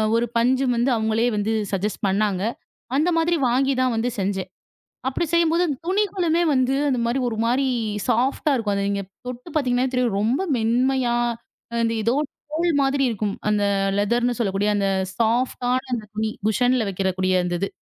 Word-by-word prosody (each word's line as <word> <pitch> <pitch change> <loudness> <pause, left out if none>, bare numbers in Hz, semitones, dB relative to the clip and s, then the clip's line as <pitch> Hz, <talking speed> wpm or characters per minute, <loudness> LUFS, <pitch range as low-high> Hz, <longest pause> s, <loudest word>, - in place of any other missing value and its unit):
ஒரு 235 - +2
பஞ்சு 260 +3 +2
வந்து 240 +3 +1
அவங்களே 220 +1 +1
வந்து 210 +2 0 0.2
சஜஸ்ட் 200 +2 -2
பண்ணாங்க. 195 -1 +1 0.5
அந்த 310 +6 +2
மாதிரி 330 +1 +2
வாங்கி 270 +3 +2
தான் 255 -2 +2
வந்து 230 +2 0
செஞ்சேன். 190 -1 -2 0.6
அப்படி 270 +6 -1
செய்யும்போது 340 +1 +3 0.2
துணிகளுமே 365 -3 +1
வந்து 260 0 +2
அந்த 260 -3 +1
மாதிரி 245 +3 0
ஒரு 220 - -4
மாதிரி 260 +3 +2 0.4
சாஃப்ட்டா 265 +5 +1
இருக்கும். 220 -5 0
அது 200 0 -1
நீங்கத் 200 -1 -3 0.2
தொட்டு 250 +5 -7
பார்த்தீங்க 250 -5 +1
என்றால், 250 -1 +1
ரொம்ப 235 - +1
மென்மையாக 240 0 +1 0.5
அந்த 230 - +1
எதோ 230 +3 +1 0.4
தோல் 330 -2 +1
மாதிரி 275 0 +1
இருக்கும். 210 -2 -2
அந்த 210 -1 +2 0.4
லேதர் 235 +4 +1
என்று 245 -1 +1
சொல்லக்கூடிய 205 -2 0
அந்த 200 -1 +1 0.3
சாஃப்ட்டான 245 +2 +1
அந்தத் 215 -4 -3
துணி 215 0 -1 0.2
குஷனில் 245 +1 +2
வைக்கறக்கூடிய 185 -1 0
அந்த 175 0 -2
இது. 195 - 0
240 Hz, 160 wpm, -23 LUFS, 210-265 Hz, 0.6 s, செய்யும்போது